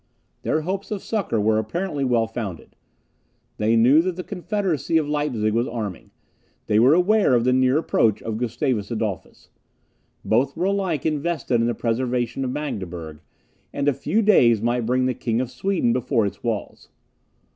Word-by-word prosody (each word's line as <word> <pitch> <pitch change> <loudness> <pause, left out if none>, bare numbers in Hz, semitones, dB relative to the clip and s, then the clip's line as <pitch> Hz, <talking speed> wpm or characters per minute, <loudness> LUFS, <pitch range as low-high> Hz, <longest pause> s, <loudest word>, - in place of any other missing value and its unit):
Their 155 - 0
hopes 190 +5 -4
of 210 -3 -4
succour 200 - -1
were 110 +1 +2
apparently 145 - -3
well 120 -3 +2
founded. 110 -7 -7 0.8
They 110 +2 +2
knew 125 +7 +6
that 185 0 -2
the 180 - -5
confederacy 180 -5 -1
of 155 -2 0
Leipzig 140 -8 -1
was 115 +2 +1
arming; 105 -6 -5 0.6
they 105 - +2
were 130 +7 +6
aware 190 -5 +3
of 120 - +2
the 125 +1 +2
near 130 +2 +3
approach 115 -9 +1
of 110 -1 -3
Gustavus 120 -2 -1
Adolphus. 110 -5 -5 0.7
Both 130 +7 +1
were 175 - 0
alike 190 -7 -1
interested 155 -5 0
in 115 - +1
the 120 - -1
preservation 120 +2 -1
of 130 - -2
Magdeburg; 90 - -5 0.5
and 140 0 -2
a 145 - +4
few 220 - 0
days 120 - +5
might 120 +1 -1
bring 130 +1 +2
the 130 - +1
King 115 -1 -2
of 125 -1 -3
Sweden 190 -12 0
before 125 -2 +1
its 100 - -5
walls. 115 -4 -4
125 Hz, 170 wpm, -23 LUFS, 115-160 Hz, 0.8 s, knew